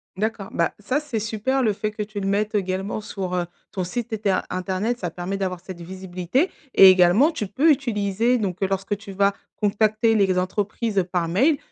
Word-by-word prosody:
D'accord. 210 Hz, 0 st, -3 dB
Bah, 170 Hz, -, 0 dB
ça 255 Hz, +7 st, 0 dB
c'est 285 Hz, -7 st, -3 dB
super, 220 Hz, +5 st, -1 dB
le 215 Hz, -3 st, +2 dB
fait, 210 Hz, +1 st, -2 dB
que 215 Hz, 0 st, -4 dB
tu 210 Hz, 0 st, -6 dB
le 195 Hz, -, -2 dB
mettes 205 Hz, +2 st, 0 dB
également 195 Hz, +1 st, -2 dB
sur, 190 Hz, -3 st, -5 dB
heu, 175 Hz, -1 st, 0 dB, 0.3 s
ton 185 Hz, -, -2 dB
site 225 Hz, +5 st, -4 dB
eter 205 Hz, -3 st, +1 dB
internet. 190 Hz, +6 st, -2 dB
Ça 175 Hz, -, -2 dB
permet 180 Hz, +4 st, -4 dB
d'avoir 185 Hz, -2 st, -2 dB
cette 180 Hz, -1 st, -9 dB
visibilité 185 Hz, -, -2 dB, 0.2 s
et 195 Hz, -, +10 dB
également, 185 Hz, -, +5 dB
tu 215 Hz, -10 st, -4 dB
peux 285 Hz, +11 st, +3 dB
utiliser 230 Hz, -3 st, +1 dB
donc, 195 Hz, -5 st, -3 dB
heu, 195 Hz, -, +2 dB
lorsque 195 Hz, +1 st, -1 dB
tu 205 Hz, -1 st, -10 dB
vas 200 Hz, +1 st, +2 dB, 0.2 s
contacter 215 Hz, +2 st, +2 dB
les 195 Hz, -3 st, +3 dB
entreprises 200 Hz, +2 st, 0 dB
par 175 Hz, -2 st, 0 dB
mail, 265 Hz, -, +3 dB
200 Hz, 195 wpm, -23 LUFS, 185-220 Hz, 0.3 s, et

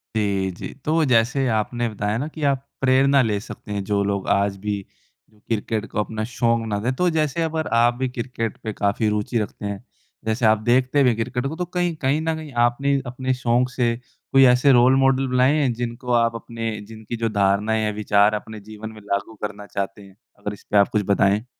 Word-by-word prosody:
जी, 100 Hz, -3 st, 0 dB
जी। 85 Hz, -, -8 dB
तो 160 Hz, +1 st, +2 dB
जैसे 130 Hz, +2 st, +2 dB
आपने 120 Hz, +2 st, -1 dB
बताया 105 Hz, 0 st, -2 dB
ना 140 Hz, +5 st, -2 dB
कि 155 Hz, -, -5 dB
आप 135 Hz, 0 st, -4 dB, 0.2 s
प्रेरणा 135 Hz, +1 st, +4 dB
ले 105 Hz, -4 st, 0 dB
सकते 105 Hz, -, -10 dB
हैं 100 Hz, -1 st, -2 dB
जो 100 Hz, 0 st, 0 dB
लोग 100 Hz, -1 st, -2 dB
आज 100 Hz, 0 st, +2 dB
भी 105 Hz, -1 st, 0 dB, 0.5 s
जो 105 Hz, -, -26 dB
क्रिकेट 110 Hz, -1 st, -1 dB
को -, -, -2 dB
अपना 110 Hz, +1 st, -2 dB
शौक़ 115 Hz, -1 st, +1 dB
ना 105 Hz, -2 st, -1 dB
दें। 120 Hz, +5 st, -1 dB
तो 180 Hz, +5 st, +2 dB
जैसे 155 Hz, +1 st, 0 dB
अगर 160 Hz, 0 st, -2 dB, 0.2 s
आप 120 Hz, 0 st, +4 dB
भी 130 Hz, -1 st, 0 dB
क्रिकेट 115 Hz, -2 st, -4 dB
पे 110 Hz, -, -3 dB
काफ़ी 100 Hz, +2 st, 0 dB
रुचि 105 Hz, +3 st, -1 dB
रखते 105 Hz, -1 st, -5 dB
हैं 100 Hz, +1 st, -4 dB, 0.4 s
जैसे 110 Hz, +1 st, 0 dB
आप 110 Hz, 0 st, +5 dB
देखते 130 Hz, +3 st, +3 dB
भी 125 Hz, -, +5 dB
हैं 120 Hz, -, +1 dB
क्रिकेट 125 Hz, +3 st, -2 dB
को 155 Hz, -, -5 dB
तो 180 Hz, +2 st, -3 dB
कहीं 175 Hz, -2 st, +1 dB
कहीं 140 Hz, +4 st, +2 dB
न 160 Hz, 0 st, -1 dB
कहीं 155 Hz, -2 st, -8 dB, 0.2 s
आपने 140 Hz, +3 st, 0 dB
अपने 130 Hz, +1 st, -2 dB
शौक़ 120 Hz, +1 st, +2 dB
से 120 Hz, -2 st, +1 dB, 0.4 s
कोई 135 Hz, 0 st, +7 dB
ऐसे 125 Hz, +3 st, +4 dB
रोल 125 Hz, +1 st, +6 dB
मॉडल 135 Hz, 0 st, +3 dB
बुलाएँ 130 Hz, +3 st, +3 dB
हैं 130 Hz, -4 st, +1 dB
जिनको 120 Hz, +1 st, -4 dB
आप 115 Hz, 0 st, 0 dB
अपने 115 Hz, 0 st, -4 dB, 0.2 s
जिनकी 110 Hz, +1 st, -7 dB
जो -, -, +1 dB
धारणाएँ 105 Hz, +3 st, +2 dB
या 105 Hz, -, 0 dB
विचार 105 Hz, 0 st, +4 dB
अपने 110 Hz, -1 st, -10 dB
जीवन 110 Hz, +1 st, -7 dB
में 110 Hz, -1 st, -13 dB
लागू 100 Hz, +2 st, -3 dB
करना 105 Hz, -1 st, -5 dB
चाहते 100 Hz, 0 st, -4 dB
हैं? 100 Hz, -1 st, -16 dB, 0.2 s
अगर 105 Hz, 0 st, -4 dB
इस 105 Hz, -, -13 dB
पर 105 Hz, -, +4 dB
आप 100 Hz, -, +6 dB
कुछ -, -, +2 dB
बताएँ। 100 Hz, +2 st, +2 dB
115 Hz, 215 wpm, -22 LUFS, 105-130 Hz, 0.5 s, कोई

